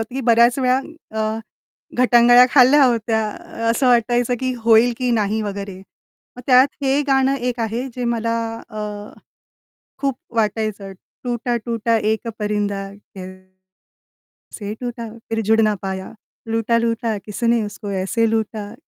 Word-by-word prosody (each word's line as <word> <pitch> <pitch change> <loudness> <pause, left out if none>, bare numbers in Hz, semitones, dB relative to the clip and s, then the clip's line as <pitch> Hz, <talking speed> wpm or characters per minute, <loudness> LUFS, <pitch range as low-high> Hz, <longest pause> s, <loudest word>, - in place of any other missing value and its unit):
होतं 225 +3 -6
की 270 - -2
बऱ्याच 235 +2 +5
वेळा 255 0 +2 0.4
अ, 215 0 -1 0.6
गटांगळ्या 245 0 +6
खाल्ल्या 275 +2 +6
होत्या. 225 -3 +1 0.5
असं 245 +3 +2
वाटायचं 240 +1 +2
की 260 -1 -1
होईल 230 +1 +5
की 250 -1 -1
नाही 220 -1 0
वगैरे. 200 -2 -5 0.6
मग - - -8
त्यात 255 +1 +6 0.2
हे 270 +2 +2
गाणं 270 0 +3
एक 245 -2 -3
आहे 230 +4 -2
जे 250 - -4
मला 230 -1 -1 0.3
अ, 215 - -7 1.2
खूप 275 -2 0 0.2
वाटायचं 215 -2 -1 0.3
टूटा, 240 0 -2
टूटा 230 -1 0
एक 220 +2 -1
परिंदा 205 -1 -2 0.3
कैसे 185 0 -13 1.0
टूटा 240 -1 -5 0.2
फिर 225 0 -1
जुडना 220 -1 +3
पाया, 190 -1 -5 0.4
लूटा, 225 +1 +1
लूटा 230 -2 -1
किसने 230 +2 0
उसको 205 0 -7
ऐसे 225 +4 +1
लूटा, 215 -2 -3
230 Hz, 130 wpm, -20 LUFS, 215-245 Hz, 1.2 s, गटांगळ्या